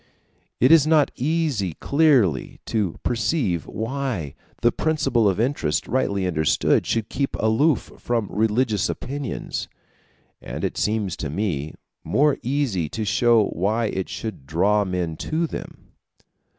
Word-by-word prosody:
It 130 +5 +5
is 160 -3 +7
not 155 -2 +4
easy 135 - -1
clearly 135 - +2
to 105 -7 -1
perceive 115 - 0
why 115 - -3 0.3
the 120 - +5
principle 135 -9 +1
of 95 - -1
interest 115 - 0
rightly 100 -7 0
understood 80 -4 +2
should 115 -2 0
keep 140 -1 -2
aloof 130 +7 +2
from 115 -4 -1
religious 110 0 +1
opinions; 140 -1 -4 0.7
and - - -6
it - - -1
seems 105 -5 -1
to 75 - -4
me 80 -4 -2 0.3
more 145 0 +2
easy 120 - -1
to 110 +6 -3
show 115 +2 +4
why 105 +6 0
it 95 -1 -3
should 105 -12 -6
draw 100 +7 +2
men 90 -4 -2
to 165 +2 -1
them. - - -8
110 Hz, 130 wpm, -23 LUFS, 95-135 Hz, 0.7 s, is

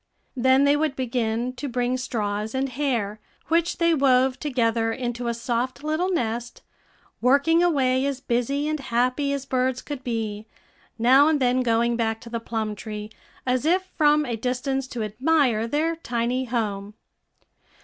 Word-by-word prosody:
Then 260 +2 +4
they 285 +1 +4
would 300 -2 0
begin 245 -1 -1
to 285 - -4
bring 245 +1 0
straws 215 -3 -3
and 270 +1 0
hair, 240 -6 -2 0.3
which 335 +1 +1
they 335 -1 +3
wove 265 -3 +3
together 230 -5 0
into 240 0 -3
a 235 - 0
soft 245 +3 -2
little 310 +4 0
nest, 240 -7 -3 0.6
working 280 +7 +4
away 265 -7 +2
as 275 -2 -2
busy 270 +3 -1
and 310 0 -1
happy 255 +2 0
as 280 -1 -3
birds 255 -1 0
could 285 -3 -6
be, 220 -3 -3 0.5
now 260 +5 +6
and 315 -2 +2
then 255 0 +2
going 235 0 +1
back 225 -1 -1
to 235 - -11
the 230 - -2
plum 220 -2 -3
tree, 210 0 -7 0.3
as 255 0 +1
if 370 +4 +1
from 300 -1 +4
a 240 -3 -2
distance 255 +3 -2
to 240 -3 -4
admire 235 0 +1
their 315 +6 0
tiny 250 -3 -2
home. 210 -4 -3
255 Hz, 160 wpm, -24 LUFS, 230-280 Hz, 0.6 s, now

